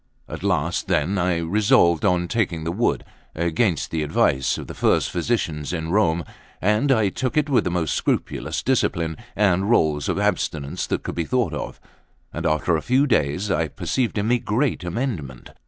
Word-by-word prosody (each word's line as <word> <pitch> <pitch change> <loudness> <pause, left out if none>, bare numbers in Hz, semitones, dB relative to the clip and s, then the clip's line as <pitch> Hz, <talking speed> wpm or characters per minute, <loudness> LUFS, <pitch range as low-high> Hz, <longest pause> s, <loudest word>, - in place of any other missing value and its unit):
At - - -7
last, - - 0
then, 90 +7 +1
I 90 -1 +1
resolved 85 -1 +3
on 90 -3 +2
taking 90 -7 -1
the 85 - -2
wood, 115 +7 0 0.3
against 85 +2 0
the 80 - -1
advice 70 -3 +1
of - - -6
the - - -8
first - - +1
physicians 85 -6 -1
in 80 -1 -3
Rome; 85 -4 +2 0.4
and 105 +8 +2
I 110 -6 +3
took 130 +8 -3
it 150 0 +3
with 130 - +3
the - - +1
most 85 -3 -1
scrupulous - - -2
discipline 80 -1 0 0.2
and 100 -1 +2
rules 75 - +2
of - - 0
abstinence 70 -3 -1
that - - -2
could - - -4
be 85 - -2
thought 125 +2 0
of; - - -5 0.5
and 85 +1 -2
after 80 +2 +1
a 80 - -1
few 130 +3 +2
days, 95 - 0
I 80 0 +1
perceived 120 - -2
in 105 +1 0
me 125 - +4
a - - -9
great 115 +1 -1
amendment. 85 - -4
90 Hz, 185 wpm, -23 LUFS, 80-110 Hz, 0.5 s, me